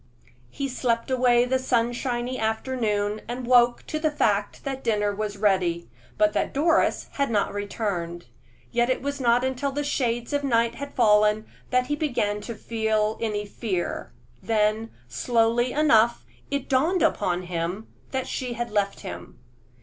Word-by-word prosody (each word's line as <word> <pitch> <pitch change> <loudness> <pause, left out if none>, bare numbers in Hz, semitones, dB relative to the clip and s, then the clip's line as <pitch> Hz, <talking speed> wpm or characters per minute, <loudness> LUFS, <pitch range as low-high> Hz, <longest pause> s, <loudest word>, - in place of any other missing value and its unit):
He 275 - -3
slept 245 -2 -1
away 245 -1 +4
the 260 +1 +1
sunshiny 240 0 -1
afternoon, 220 -2 -1
and 245 +1 -4
awoke 240 -1 +4
to 310 - -3
the 310 0 +2
fact 205 -8 0
that 270 -1 -4
dinner 210 -2 +1
was 205 0 -4
ready, 180 - +1 0.3
but 210 0 +3
that 210 - -1
Doris 320 +3 +2
had 280 -1 -1
not 210 -3 0
returned; 195 -4 -3 0.5
yet 240 +1 +2
it 255 - 0
was 280 0 -3
not 240 0 +3
until 260 +2 -1
the 290 +2 -2
shades 240 -3 -1
of 285 0 0
night 235 -3 +2
had 280 +3 -8
fallen 210 -2 +4 0.2
that 250 0 +2
he 295 - -1
began 225 -9 -1
to 235 +2 -6
feel 220 -1 0
any 210 -2 -1
fear; 200 -4 -3 0.3
then, 220 0 +1 0.2
slowly 235 - +1
enough, 235 -6 +3 0.2
it 280 -2 -2
dawned 315 +8 +2
upon 180 -3 +1
him 175 +4 -3 0.2
that 260 -1 -2
she 250 -2 -3
had 235 -1 -4
left 200 -2 0
him. 85 0 -8
230 Hz, 155 wpm, -25 LUFS, 210-255 Hz, 0.5 s, away